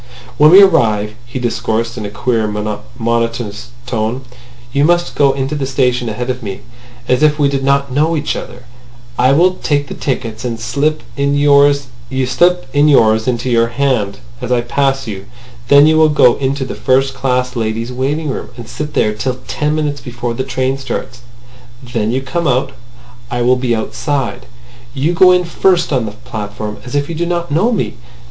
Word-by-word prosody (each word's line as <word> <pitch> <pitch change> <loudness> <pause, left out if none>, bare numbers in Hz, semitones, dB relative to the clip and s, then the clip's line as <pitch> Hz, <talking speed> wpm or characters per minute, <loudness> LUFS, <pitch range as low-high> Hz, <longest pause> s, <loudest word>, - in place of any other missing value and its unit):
"When 150 +1 +7
we 190 +4 +9
arrive," 110 - +2
he 120 - -6
discoursed 115 -1 -2
in 110 -4 -5
a - - -7
queer, 115 0 -1
monotonous 115 +1 -3 0.2
tone, 120 +1 -2 0.5
"you 140 - +2
must 175 +2 +2
go 140 -2 +3
into 135 +1 -3
the 140 -3 -2
station 125 -3 0
ahead 125 +4 -3
of 125 0 -6
me, 100 -4 -6 0.5
as 125 +2 +2
if 150 -1 +4
we 145 -2 +3
did 140 -1 -1
not 140 0 +1
know 155 +5 +1
each 150 - -2
other. 125 +1 -8 0.6
I 130 +2 +4
will 180 +6 +3
take 145 -2 0
the - - -5
tickets, 115 -4 -4
and 115 -2 -3
slip 145 +6 -1
in 140 0 0
yours 145 0 +4 0.3
into 130 -5 +2
your 115 -1 +3
hand 120 -5 -1 0.2
as - - -4
I 125 -1 +3
pass 135 +2 0
you. 100 -3 -7 0.4
Then 140 +1 +7
you 155 0 +4
will 155 -1 +5
go 135 -5 +5
into 135 0 -1
the - - -5
first 135 +1 +1
class 125 -1 -1
ladies' 115 +1 -2
waiting 145 +5 -2
room, - - -5
and 120 - -9
sit 150 -1 -6
there 105 - +2
till 125 +4 -3
ten 150 0 -1
minutes 150 -2 -2
before 120 -1 -4
the 130 - -3
train 130 0 -2
starts. 130 -1 -5 0.6
Then 115 -4 -2
you 130 +2 -1
come 170 +5 -2
out. 130 +1 +1 0.6
I 120 0 -1
will 125 +1 +4
be 125 -2 0
outside. 130 +1 -3 0.5
You 145 +6 0
go 180 +2 +6
in 180 0 +3
first 175 -1 +1
on 125 -4 0
the 105 - -6
platform, 110 -2 -6
as 125 +2 -7
if 145 0 0
you 170 - -5
did 170 +2 -2
not 170 -2 -2
know 185 +11 +2
me. 225 - -2
130 Hz, 180 wpm, -15 LUFS, 115-145 Hz, 0.6 s, we